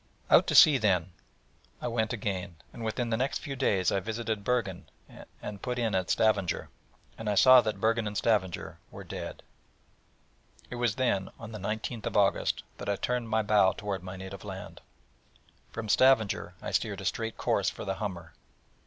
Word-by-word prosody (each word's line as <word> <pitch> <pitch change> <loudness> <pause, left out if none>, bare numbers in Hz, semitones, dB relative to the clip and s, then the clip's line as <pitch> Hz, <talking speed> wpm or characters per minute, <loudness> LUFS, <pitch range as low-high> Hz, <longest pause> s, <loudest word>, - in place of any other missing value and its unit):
Out - - +6
to - - 0
sea, 145 -4 +8
then, 95 -5 +1 0.7
I - - -4
went 115 -2 0
again; 95 -6 -3 0.2
and 115 - -8
within 115 +2 -2
the 110 - +1
next 130 +3 0
few 140 -3 -6
days 100 -9 +1
I 100 - +1
visited 110 +1 -3
Bergen, 95 -9 -1 0.5
and 105 -1 -7
put 125 -1 -3
in 115 -3 0
at 95 -2 0
Stavanger. 100 -5 +1 0.5
And 110 -1 -3
I 105 - +1
saw 130 +4 +8
that 105 -4 -3
Bergen 115 +1 +1
and 105 0 -4
Stavanger 100 -6 0
were - - -10
dead. - - -7 1.3
It 125 - -5
was 120 -3 0
then, 100 -7 0
on 115 -1 -9
the 110 - -7
19th 110 +3 -4
August, 100 -1 +2 0.2
that - - -5
I 100 - +2
turned 120 +2 -2
my 110 0 +1
bow 105 -2 +4
toward 100 -2 -4
my 95 +1 -7
native 95 +1 -8
land. 95 -2 -8 0.9
From 115 -1 -6
Stavanger 115 -2 +3
I - - -4
steered - - -1
a - - -7
straight 115 -1 -2
course - - +1
for - - -8
the 95 - -1
Humber. 90 -6 -5
105 Hz, 180 wpm, -29 LUFS, 95-115 Hz, 1.3 s, sea